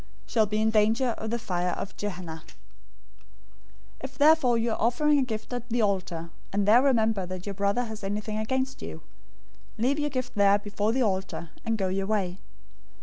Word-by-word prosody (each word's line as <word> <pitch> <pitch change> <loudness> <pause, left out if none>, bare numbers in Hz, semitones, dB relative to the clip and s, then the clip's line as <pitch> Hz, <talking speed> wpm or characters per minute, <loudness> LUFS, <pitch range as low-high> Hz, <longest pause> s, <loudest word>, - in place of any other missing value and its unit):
shall 220 -3 +2
be 210 +1 -1
in 220 0 +2
danger 220 +4 +3
of 220 - -4
the 235 - 0
fire 180 -6 -1
of 195 - -6
Gehenna.{or, 180 -5 -5
Hell} 160 - -16
005:023 - - -17 1.5
"If 265 -1 -8
therefore 290 -5 +5
you 230 0 0
are - - -3
offering 290 +6 +3
your 270 - +2
gift 220 0 -5
at 245 0 -5
the 235 0 +1
altar, 175 -5 -1 0.2
and 200 0 0
there 230 +4 +7
remember 225 -8 +2
that 185 0 -6
your 200 - -3
brother 200 +5 +1
has 220 -2 -8
anything 210 +2 -3
against 260 +4 -2
you, 80 0 -7 0.7
005:024 220 - -2
leave 280 +4 +2
your 295 0 0
gift 255 -3 -3
there 200 0 +5
before 205 +1 -1
the 255 +2 +1
altar, 190 -5 -2
and 225 -1 0
go 195 -2 0
your 195 +1 -1
way. 195 -3 -1
215 Hz, 200 wpm, -27 LUFS, 195-245 Hz, 1.5 s, there